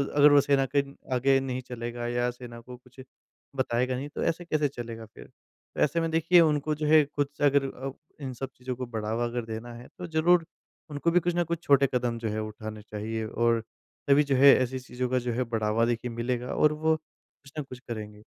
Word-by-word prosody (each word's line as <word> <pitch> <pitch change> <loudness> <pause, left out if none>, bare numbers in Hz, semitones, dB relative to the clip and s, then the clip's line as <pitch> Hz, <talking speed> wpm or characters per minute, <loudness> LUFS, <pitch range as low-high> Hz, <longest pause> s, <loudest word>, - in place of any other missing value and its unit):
अगर 145 0 +7
वो 145 0 +7
सेना 135 -1 +2
के 140 - +5 0.3
आगे 135 +2 +3
नहीं 130 -1 -3
चलेगा, 120 -1 -5
या 120 0 0
सेना 120 -1 -10
को 125 +1 -11
कुछ 125 +1 -21 0.6
बताएगा 125 -1 0
नहीं, 140 +3 -5
तो - - -4
ऐसे-कैसे 165 -3 0
चलेगा 115 -4 -7
फिर? 110 - -14
तो - - -12
ऐसे 165 +3 +2
में 165 - 0
देखिए, 165 +2 +5
उनको 155 -1 +2
जो 150 0 -3
है, 155 0 +7
खुद 145 0 -2
से - - -3
अगर 140 0 +4
अब 135 +1 -6 0.2
इन 130 -2 -4
सब 135 +2 -5
चीज़ों 125 0 -5
को 125 +1 -4
बढ़ावा 115 0 -2
अगर 120 0 -3
देना 115 +2 -6
है, 120 +1 -11
तो 180 - -6
ज़रूर 165 +1 +3 0.4
उनको 150 +3 0
भी 180 - +5
कुछ 175 +1 -1
ना 175 - +2
कुछ 170 0 -4
छोटे 140 -1 +5
कदम 120 -2 0
जो 115 -1 -2
है, 105 +1 -2
उठाने 110 0 -7
चाहिए 110 +1 -4
और 115 0 +1 0.4
तभी 140 +1 +5
जो 140 -2 0
है, 140 +2 +8
ऐसी 130 0 -1
चीज़ों 125 0 -4
का 130 - +2
जो 120 0 -3
है, 125 +2 0
बढ़ावा 115 -1 0
देखिए, 120 0 -2
मिलेगा 120 +1 -2
और 150 0 +4
वो 160 +1 +1
कुछ 140 -2 -23
न - - -2
कुछ 130 -2 -11
करेंगे। 105 -2 -7
125 Hz, 220 wpm, -27 LUFS, 120-145 Hz, 0.6 s, है